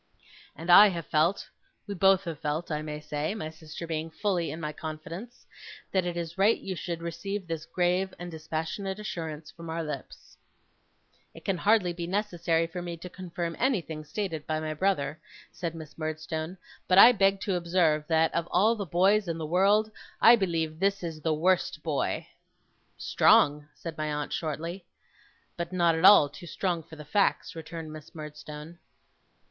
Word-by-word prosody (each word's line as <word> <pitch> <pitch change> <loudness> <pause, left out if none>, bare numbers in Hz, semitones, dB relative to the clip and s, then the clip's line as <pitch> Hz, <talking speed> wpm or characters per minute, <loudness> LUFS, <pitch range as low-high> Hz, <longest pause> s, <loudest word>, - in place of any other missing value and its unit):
And 165 +4 -2
I 205 +4 +10
have 170 -4 -3
felt 160 +5 +1 0.4
we 205 - -5
both 195 0 +4
have 165 -5 -5
felt, 155 +3 -3
I 150 0 -1
may 150 -1 -5
say; 150 +4 -3
my 155 -8 -5
sister 160 +1 -9
being 160 0 -3
fully 175 0 -1
in 160 - -6
my 155 -2 -4
confidence 165 +10 -8 0.5
that 185 -2 +1
it 175 -1 -3
is 170 +1 -5
right 210 +4 +4
you 190 - -5
should 170 -1 -5
receive 185 +4 -4
this 165 -1 -5
grave 180 +1 +1
and 175 0 -7
dispassionate 160 +5 -4
assurance 160 -7 -6
from 165 -1 -10
our 165 +1 -2
lips.' 150 -1 -8 1.0
'It - - -13
can 195 -4 0
hardly 205 -4 +3
be 170 0 -5
necessary 175 -4 0
for 170 +2 -6
me 175 -1 -5
to 180 +2 -9
confirm 175 -2 -5
anything 175 - 0
stated 160 -1 -4
by 155 0 0
my 155 0 -3
brother,' 155 -3 0 0.3
said 170 -2 -4
Miss 160 -2 -10
Murdstone; 155 +2 -4 0.3
'but 185 - +4
I 230 +5 +11
beg 195 -3 +3
to 200 - -1
observe, 170 -3 +2
that, 160 0 +2
of 170 0 -1
all 210 +6 +4
the 200 -4 -5
boys 195 +5 +3
in 165 -1 -2
the 160 - -4
world, 200 +6 +3 0.3
I 235 - +8
believe 165 -6 -1
this 195 0 +1
is 160 -2 -5
the 160 - 0
worst 170 -1 +1
boy.' 150 -4 -1 0.7
'Strong!' 145 0 +4
said 165 -2 -7
my 155 0 -1
aunt, 150 0 -3
shortly. 165 +4 -4 0.7
'But 170 0 -4
not 170 -2 +3
at 160 +2 +1
all 195 -7 +9
too 155 +5 -12
strong 175 -1 -1
for 160 0 -13
the 150 -1 -10
facts,' 200 +4 +1
returned 160 -1 -7
Miss 155 +1 -12
Murdstone. 150 +1 -9
170 Hz, 175 wpm, -28 LUFS, 155-190 Hz, 1.0 s, I